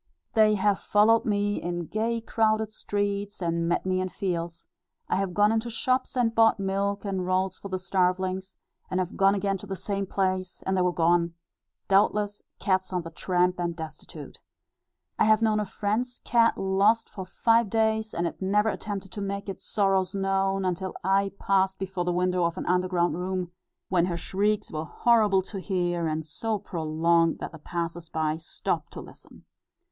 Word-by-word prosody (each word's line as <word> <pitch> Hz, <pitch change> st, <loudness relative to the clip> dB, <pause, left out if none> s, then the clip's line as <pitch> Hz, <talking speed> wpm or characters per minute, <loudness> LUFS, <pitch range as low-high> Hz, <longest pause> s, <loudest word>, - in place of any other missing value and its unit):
They 215 Hz, -2 st, +5 dB
have 200 Hz, 0 st, +2 dB
followed 220 Hz, +2 st, +4 dB
me 205 Hz, -1 st, 0 dB
in 175 Hz, 0 st, -3 dB
gay 225 Hz, +6 st, -1 dB
crowded 220 Hz, -1 st, +1 dB
streets, 205 Hz, -1 st, -2 dB
and 170 Hz, -1 st, -1 dB
met 175 Hz, -, 0 dB
me 185 Hz, 0 st, +1 dB
in 185 Hz, -, -2 dB
fields; 170 Hz, -3 st, -4 dB, 0.4 s
I -, -, +1 dB
have 190 Hz, -2 st, -2 dB
gone 210 Hz, +1 st, +4 dB
into 225 Hz, +1 st, 0 dB
shops 255 Hz, +3 st, 0 dB
and 235 Hz, -2 st, +2 dB
bought 225 Hz, -2 st, +4 dB
milk 200 Hz, +1 st, -1 dB
and 190 Hz, -2 st, -2 dB
rolls 185 Hz, +1 st, 0 dB
for -, -, -7 dB
the 185 Hz, -, -1 dB
starvelings; 185 Hz, 0 st, -1 dB, 0.3 s
and 185 Hz, -, -1 dB
have 185 Hz, -1 st, -2 dB
gone 195 Hz, +1 st, +4 dB
again 195 Hz, -1 st, -1 dB
to 205 Hz, -, -10 dB
the 195 Hz, -, -3 dB
same 195 Hz, +1 st, -3 dB
place, 185 Hz, -1 st, -2 dB
and 190 Hz, -, +1 dB
they 185 Hz, -, +2 dB
were 180 Hz, 0 st, +2 dB
gone, 170 Hz, 0 st, +2 dB, 0.5 s
doubtless, 205 Hz, +1 st, +2 dB, 0.2 s
cats 190 Hz, -2 st, 0 dB
on 180 Hz, -2 st, -1 dB
the 165 Hz, -, -8 dB
tramp 180 Hz, +1 st, 0 dB
and 170 Hz, -1 st, -1 dB
destitute. 160 Hz, -2 st, -9 dB, 0.8 s
I -, -, +5 dB
have 215 Hz, +1 st, +4 dB
known 215 Hz, -1 st, +3 dB
a 210 Hz, -, -1 dB
friend's 220 Hz, +6 st, -2 dB
cat 230 Hz, -1 st, +3 dB
lost 200 Hz, +4 st, +2 dB
for 190 Hz, -, -7 dB
five 230 Hz, +4 st, +2 dB
days, 220 Hz, 0 st, +1 dB
and 170 Hz, -, -2 dB
it 170 Hz, -, -4 dB
never 210 Hz, +3 st, +2 dB
attempted 200 Hz, -3 st, -5 dB
to 205 Hz, -, -6 dB
make 200 Hz, 0 st, -4 dB
its 195 Hz, -, -7 dB
sorrows 195 Hz, -2 st, +1 dB
known, 195 Hz, 0 st, 0 dB
until 185 Hz, +1 st, -2 dB
I 195 Hz, +1 st, +2 dB
passed 190 Hz, -1 st, +1 dB
before 190 Hz, -2 st, -3 dB
the 180 Hz, -, +1 dB
window 180 Hz, 0 st, +1 dB
of 170 Hz, +1 st, -2 dB
an -, -, -4 dB
underground 180 Hz, -1 st, +1 dB
room, 180 Hz, -1 st, -3 dB, 0.4 s
when 180 Hz, -1 st, +2 dB
her 170 Hz, -2 st, -2 dB
shrieks 205 Hz, +4 st, -1 dB
were 155 Hz, 0 st, -3 dB
horrible 210 Hz, -1 st, +3 dB
to 195 Hz, +1 st, -7 dB
hear, 175 Hz, -3 st, -1 dB
and 155 Hz, 0 st, -2 dB
so 215 Hz, +8 st, -2 dB
prolonged, 165 Hz, -1 st, +1 dB
that -, -, -6 dB
the 160 Hz, -, -11 dB
passers 170 Hz, +1 st, -4 dB
by 155 Hz, -1 st, -1 dB
stopped 160 Hz, -, -3 dB
to -, -, -7 dB
listen. -, -, -16 dB
190 Hz, 185 wpm, -27 LUFS, 180-205 Hz, 0.8 s, They